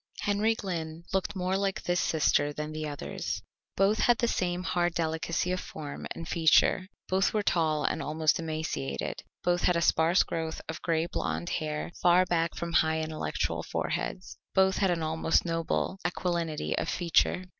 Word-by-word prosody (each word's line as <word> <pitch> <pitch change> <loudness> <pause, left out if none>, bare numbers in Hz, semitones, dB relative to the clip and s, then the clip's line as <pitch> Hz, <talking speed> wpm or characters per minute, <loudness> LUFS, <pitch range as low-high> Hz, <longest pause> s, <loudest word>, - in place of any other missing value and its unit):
Henry 210 +2 +2
Glynn 165 -5 -4
looked 195 +2 0
more 185 0 0
like 195 0 -1
this 175 0 +1
sister 145 -3 +2
than 150 +1 -5
the 155 0 -4
others. 145 -1 -4 0.3
Both 200 +3 +3
had 240 -1 +4
the 235 - +1
same 180 -4 -1
hard 175 -2 0
delicacy 160 +2 -1
of 185 - 0
form 145 -5 -7
and 165 - -7
feature, 170 +3 +4 0.2
both 190 +3 +1
were 210 - +2
tall 160 -5 +1
and - - 0
almost 155 +1 +1
emaciated, 155 - -3 0.2
both 175 0 +2
had 180 - +4
a 170 - +1
sparse 165 +4 +4
growth 160 -1 -3
of 160 - -5
gray 165 -1 +1
blond 175 0 -3
hair 155 +1 -2
far 180 +1 +5
back 165 -2 0
from 170 0 -4
high 160 -1 +3
intellectual 155 0 -2
foreheads, - - -3 0.2
both 190 0 +4
had 195 - +2
an 170 -2 0
almost 160 +2 +1
noble 165 +3 -1
aquilinity 170 -3 -1
of - - -2
feature. 175 +1 +2
170 Hz, 165 wpm, -29 LUFS, 160-185 Hz, 0.3 s, far